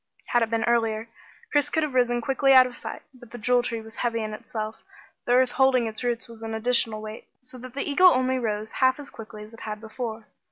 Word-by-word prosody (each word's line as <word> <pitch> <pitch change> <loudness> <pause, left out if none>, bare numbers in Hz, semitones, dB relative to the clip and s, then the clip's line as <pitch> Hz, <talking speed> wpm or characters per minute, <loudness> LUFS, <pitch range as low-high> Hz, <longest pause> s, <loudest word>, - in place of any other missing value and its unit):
Had 240 - +3
it 225 - +1
been 225 0 0
earlier, 225 -1 +1 0.4
Chris 290 -1 +2
could 320 - +1
have 300 -3 -2
risen 245 -1 +2
quickly 270 +2 +3
out 260 -1 +9
of 250 -1 -7
sight. - - -7
But 245 -3 -15
the 245 - -8
Jewel 245 +2 +2
Tree 230 -2 -3
was 220 0 -13
heavy 230 -2 -1
in 215 0 -4
itself; 215 -1 -5 0.5
the 245 - +2
earth 255 0 +4
holding 265 -2 +3
its 220 +2 -5
roots 240 -2 -1
was 230 -1 -13
an 225 0 -4
additional 220 -2 +1
weight, 215 +1 -8 0.2
so 255 0 -11
that 255 +1 -10
the 280 - -2
eagle 335 +6 +6
only 260 -2 +1
rose 215 -2 -3
half 260 +1 +2
as 285 - -9
quickly 215 -1 -10
as 215 +2 -14
it 230 - -12
had 210 -1 -5
before. 220 0 -6
235 Hz, 240 wpm, -25 LUFS, 220-255 Hz, 0.5 s, out